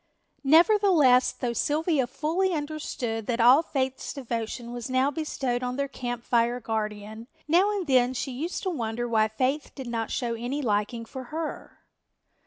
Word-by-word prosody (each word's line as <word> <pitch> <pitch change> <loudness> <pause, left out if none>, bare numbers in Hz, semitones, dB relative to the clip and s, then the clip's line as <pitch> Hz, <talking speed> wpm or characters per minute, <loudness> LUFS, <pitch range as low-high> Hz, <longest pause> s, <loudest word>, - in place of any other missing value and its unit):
Nevertheless, 320 - +5
though 240 -1 -3
Sylvia 295 +1 +1
fully 350 +8 0
understood 290 -7 -3
that 240 -1 -1
all 250 +6 +7
Faith's 265 -5 -3
devotion 235 -2 -4
was 245 0 -5
now 260 +2 +2
bestowed 270 -5 -2
on 250 0 -2
their 280 +1 -1
Camp 245 -3 -5
Fire 240 +1 +1
guardian, 220 0 -4 0.2
now 355 +6 +4
and 405 -3 -2
then 255 -3 +3
she 265 - -3
used 310 +8 -4
to 375 - -1
wonder 240 -5 -3
why 220 -2 +3
Faith 260 +7 -1
did 265 - -7
not 230 -2 -3
show 240 -3 -2
any 245 +5 -3
liking 215 +1 -1
for 260 +3 -8
her. 310 +4 -6
255 Hz, 160 wpm, -26 LUFS, 235-300 Hz, 0.2 s, all